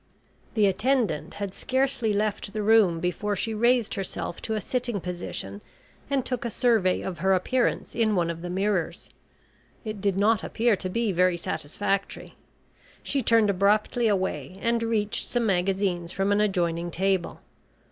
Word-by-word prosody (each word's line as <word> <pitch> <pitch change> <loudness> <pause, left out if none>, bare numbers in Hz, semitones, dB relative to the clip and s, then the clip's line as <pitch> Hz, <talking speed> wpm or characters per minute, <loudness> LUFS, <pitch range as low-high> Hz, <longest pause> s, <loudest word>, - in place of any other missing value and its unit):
The 215 -2 +4
attendant 200 - 0
had 200 -2 -4
scarcely 260 -3 0
left 205 0 -1
the 215 -1 -2
room 205 -6 +4
before 200 +4 -1
she 220 +3 -2
raised 235 +1 +2
herself 190 -3 -4
to 220 - -2
a - - 0
sitting 240 0 -2
position, 170 - -5 0.5
and 275 -3 0
took 250 -2 -3
a 235 - -2
survey 220 -5 +2
of 180 -4 -5
her 190 +3 +3
appearance 245 +7 0
in 220 -3 +1
one 170 -2 +1
of 165 0 -8
the 175 - -5
mirrors. 190 -2 -2 0.7
It 215 -2 -5
did 200 -2 +1
not 210 +1 +3
appear 230 -1 +1
to 185 -1 -4
be 230 +2 0
very 180 0 +2
satisfactory. 175 +5 -3 0.7
She 280 - 0
turned 225 -3 +4
abruptly 210 +4 +2
away 190 -2 -1
and 235 0 +1
reached 220 -2 -1
some 240 -2 0
magazines 185 -2 0
from 195 +1 0
an 205 +1 +3
adjoining 175 -4 0
table. 190 0 -1
200 Hz, 155 wpm, -26 LUFS, 180-225 Hz, 0.7 s, The